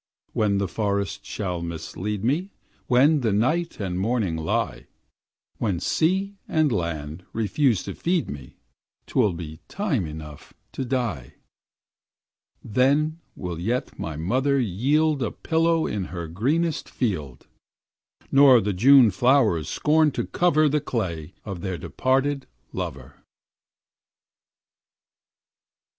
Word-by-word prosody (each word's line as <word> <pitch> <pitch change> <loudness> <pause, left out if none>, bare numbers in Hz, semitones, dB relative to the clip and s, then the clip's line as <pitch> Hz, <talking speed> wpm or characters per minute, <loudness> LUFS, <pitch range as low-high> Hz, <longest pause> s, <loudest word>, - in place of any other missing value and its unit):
When 105 -2 +1
the 100 -1 0
forest 100 +1 -2
shall 90 -5 -3
mislead 85 +5 -4
me, 155 - 0 0.4
When 140 +5 +5
the 115 -3 +1
night 130 +12 0
and 90 -3 -2
morning 105 -4 0
lie, 70 -5 -2 0.7
When 100 -6 0
sea 190 - 0
and 155 -3 +2
land 85 -3 -3
refuse 115 0 +1
to - - -5
feed 175 -1 0
me, 70 -3 -9 0.5
'T - - -15
will 110 -8 +3
be 80 -2 -7
time 150 - -1
enough 75 -1 -10 0.2
to - - -4
die; 115 - -2 1.3
Then 145 +8 +2 0.2
will 90 -3 -5
yet 115 +8 -2
my 80 -2 -4
mother 130 - +1
yield 135 - +1
A 115 - 0
pillow 165 0 +1
in 100 -3 -2
her 85 -2 -6
greenest 145 - -1
field, 80 - -3 0.9
Nor 135 -3 +7
the 105 -1 -1
June 125 +3 +7
flowers 105 - +3
scorn 155 +1 +3
to - - -2
cover 155 -3 +3
The 150 +1 +1
clay 90 - -3
of 95 -5 -6
their 95 -3 -3
departed 135 +5 0 0.3
lover.' - - -6
110 Hz, 120 wpm, -24 LUFS, 90-145 Hz, 1.3 s, Nor